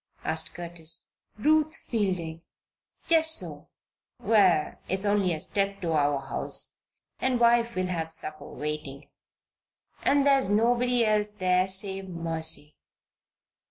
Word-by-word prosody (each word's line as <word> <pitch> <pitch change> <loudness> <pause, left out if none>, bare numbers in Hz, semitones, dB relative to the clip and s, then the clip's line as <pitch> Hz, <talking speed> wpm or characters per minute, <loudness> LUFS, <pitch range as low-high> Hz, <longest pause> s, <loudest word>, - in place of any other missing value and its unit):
asked 160 0 -2
Curtis. 170 -2 -2 0.2
"Ruth 310 +6 +2
Fielding." 185 - -3 0.7
"Just 320 -1 +6
so! - - -4 0.5
Well, 185 -8 +3 0.2
it's 190 +2 +2
only 205 -3 +1
a 160 - -3
step 195 +4 0
to 170 -2 -2
our 145 -2 +1
house 135 - -1 0.4
and 255 -2 0
wife 235 0 +3
will 185 - -1
have 165 -3 -3
supper 155 -1 -4
waiting. 150 -2 -6 0.9
And 285 0 +2
there's 275 -6 +3
nobody 240 +3 +2
else 210 -1 +1
there 185 -2 +1
save 190 0 0
Mercy." 160 -3 -1
190 Hz, 120 wpm, -27 LUFS, 160-235 Hz, 0.9 s, Just